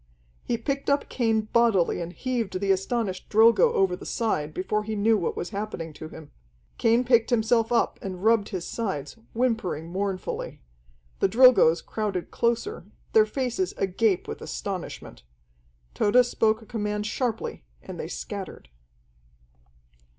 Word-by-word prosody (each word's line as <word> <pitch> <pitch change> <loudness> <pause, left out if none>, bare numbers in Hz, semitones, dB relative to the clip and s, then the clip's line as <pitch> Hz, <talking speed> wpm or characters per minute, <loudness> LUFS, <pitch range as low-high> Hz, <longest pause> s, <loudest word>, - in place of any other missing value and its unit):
He 235 - -1
picked 275 +5 -2
up 280 0 +1
Cain 225 -3 +1
bodily 215 -6 +2
and 170 0 -5
heaved 230 -4 -3
the 195 0 +1
astonished 195 0 -1
Drilgo 220 -1 +5
over 190 -2 +2
the - - -12
side 155 -10 -1
before 210 +6 -2
he 220 0 -4
knew 220 +2 +3
what 185 -5 -2
was 175 - -4
happening 200 -6 -5
to 155 - -8
him. 155 -2 -12 0.5
Cain 230 +2 +3
picked 235 -2 +3
himself 230 -1 +2
up 235 - +1
and 185 -1 -6
rubbed 220 -2 +3
his 185 -5 -4
sides, 190 -11 -4 0.2
whimpering 225 -10 -1
mournfully. 190 0 -3 0.6
The - - +3
Drilgoes 225 -8 +6
crowded 205 -5 -3
closer, 235 - -1 0.3
their 440 -1 +6
faces 270 +7 -2
agape 195 +1 +1
with - - -6
astonishment. - - -6 0.7
Tode 245 +4 +4
spoke 225 -2 +1
a - - -15
command 210 -2 -3
sharply, 225 - -3 0.2
and - - -8
they - - -4
scattered. - - -7
215 Hz, 145 wpm, -26 LUFS, 185-235 Hz, 0.7 s, Drilgoes